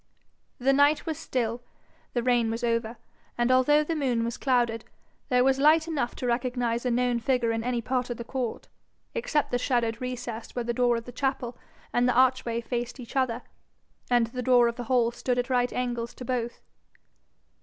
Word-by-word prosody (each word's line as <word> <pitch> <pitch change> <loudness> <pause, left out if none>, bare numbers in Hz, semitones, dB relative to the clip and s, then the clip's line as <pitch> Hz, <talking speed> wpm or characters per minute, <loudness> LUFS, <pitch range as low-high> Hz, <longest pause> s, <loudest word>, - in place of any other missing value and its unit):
The 270 +2 +2
night 285 +2 +4
was 320 -3 -3
still, 240 -1 -2 0.5
the 240 - 0
rain 240 -2 +2
was 230 +2 -3
over, 230 0 0 0.4
and 240 +1 +2
although 295 +4 +5
the 325 +2 -2
moon 250 -6 0
was 235 +1 -3
clouded, 240 -4 +1 0.5
there 250 -1 +4
was 265 0 +3
light 310 +3 +5
enough 285 -7 -2
to - - -5
recognise 245 0 0
a - - +2
known 245 0 +1
figure 240 -1 +1
in 225 0 -2
any 245 -1 -1
part 255 0 -1
of 240 - -4
the 235 - -5
court, 245 -1 -4 0.5
except 310 -11 0
the 245 - +1
shadowed 235 -3 0
recess 245 -3 -5
where 245 -1 -2
the 240 - -1
door 245 0 +2
of 230 - -6
the 245 - -8
chapel 260 -2 -2 0.4
and 245 +1 +3
the - - +1
archway 250 -2 +3
faced 240 +2 -4
each 240 +1 -10
other, 255 -3 0 0.7
and 240 -2 +4
the 250 +2 -5
door 245 -1 +5
of 235 - -2
the 245 - -6
hall 235 -1 +2
stood 245 +1 -2
at 245 +2 -1
right 245 -1 +2
angles 240 -2 -3
to 250 - -8
both. 240 -1 -3
245 Hz, 195 wpm, -27 LUFS, 235-255 Hz, 0.7 s, although